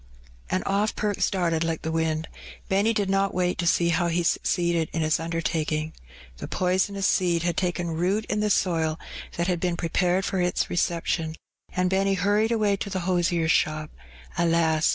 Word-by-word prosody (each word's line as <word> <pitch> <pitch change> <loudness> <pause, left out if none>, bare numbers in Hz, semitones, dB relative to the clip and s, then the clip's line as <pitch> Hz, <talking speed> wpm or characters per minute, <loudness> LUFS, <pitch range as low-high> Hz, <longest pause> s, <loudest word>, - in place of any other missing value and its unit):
And 185 - -1
oflF 200 +2 +1
Perks 205 -2 0
darted 170 -4 0
like 165 -1 -2
the 160 - -2
wind. 160 0 -1 0.4
Benny 200 +4 +3
did 205 -3 0
not 195 0 +1
Yait 180 0 0
to 175 - -1
see 170 +1 +3
how 170 +1 +1
he 170 +1 0
succeeded 170 -1 +1
in 160 - 0
his 155 0 +2
undertaking. 160 -1 -2 0.4
The - - -6
)oisonous 190 +2 0
seed 175 -4 +2
had 175 -1 0
taken 175 -2 -1
root 185 +7 0
in 210 - -1
the 210 0 +1
soil 165 -5 +1 0.4
that 170 - 0
had 180 -1 0
been 175 -1 -1
prepared 180 +2 +1
for 190 - -1
its 180 0 0
reception, 165 -2 -1 0.4
and 185 0 0
Benny 195 +1 +2
hurried 205 +4 +2
away 210 -3 +2
to 200 - -4
the 190 -2 -2
losier's 175 -2 +1
shop, 155 -1 0 0.5
alas 165 -2 +3
175 Hz, 175 wpm, -25 LUFS, 165-190 Hz, 0.5 s, Benny